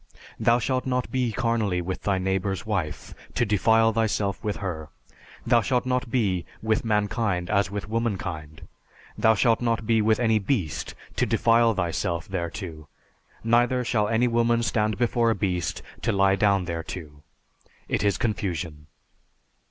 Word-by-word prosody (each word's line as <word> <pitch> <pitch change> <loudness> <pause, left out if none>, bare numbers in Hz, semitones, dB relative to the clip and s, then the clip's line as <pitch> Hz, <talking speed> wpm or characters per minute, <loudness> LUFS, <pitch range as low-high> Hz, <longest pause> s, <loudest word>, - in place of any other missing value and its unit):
Thou 115 +1 +4
shalt 130 +2 -1
not 125 -1 -1
be 125 -3 0
carnally 110 -5 0
with 90 +1 -4
thy 100 -2 +1
neighbor's 95 +1 -1
wife, 90 -9 -3 0.2
to 120 - +2
defile 110 +2 +3
thyself 105 -3 0
with 105 -1 -1
her. 80 -6 -5 0.6
Thou 120 - +4
shalt 125 +3 0
not 125 -1 -1
be 100 -8 +1 0.2
with 110 -1 0
mankind 105 -4 0
as 100 -1 +2
with 100 -2 -5
womankind. 95 -9 -3 0.5
And - - -10
thou 110 0 +6
shalt 115 +2 +2
not 115 -2 0
be 115 0 +3
with 110 +1 +2
any 110 -3 +3
beast 95 - -2 0.2
to - - +2
defile 115 -1 +3
thyself 85 -1 -2
thereto; 85 -3 -5 0.6
neither 120 +2 +2
shall 110 -3 +1
any 115 +2 +2
woman 120 0 +2
stand 105 0 0
before 120 -1 +2
a 115 - +2
beast 90 -4 -2 0.2
to 115 - +1
lie 95 -1 +3
down 100 -2 +2
thereto; 80 -3 -6 0.7
it - - -1
is 100 -3 +2
confusion." 85 -8 -3
105 Hz, 150 wpm, -25 LUFS, 95-115 Hz, 0.7 s, thou